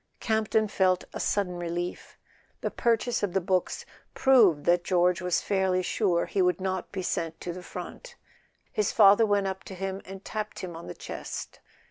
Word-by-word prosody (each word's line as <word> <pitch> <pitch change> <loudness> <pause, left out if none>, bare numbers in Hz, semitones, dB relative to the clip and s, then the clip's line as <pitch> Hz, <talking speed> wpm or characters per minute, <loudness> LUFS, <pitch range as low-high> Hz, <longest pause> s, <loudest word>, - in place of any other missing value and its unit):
Campton 220 -1 +1
felt 185 -3 +2
a - - -5
sudden 185 -3 0
relief. 175 +1 -4 0.4
The - - -2
purchase 235 0 +1
of 200 -4 -1
the 190 - +3
books 185 -1 -1 0.3
proved 220 - +5
that 175 0 +3
George 180 0 +2
was 180 -1 +1
fairly 190 -2 +1
sure 180 -4 +1
he 195 - 0
would 180 -1 +2
not 190 0 -3
be 190 -2 -4
sent 165 -2 -2
to 175 - -4
the 180 - -8
front. - - -9 0.6
His 210 -2 0
father 210 +1 +6
went 205 -1 +2
up 190 0 -3
to 190 - -8
him 195 +1 -4
and 195 0 -10
tapped 215 -1 -4
him 175 -3 -6
on 165 - -9
the - - -7
chest. - - -7
190 Hz, 180 wpm, -28 LUFS, 180-205 Hz, 0.6 s, father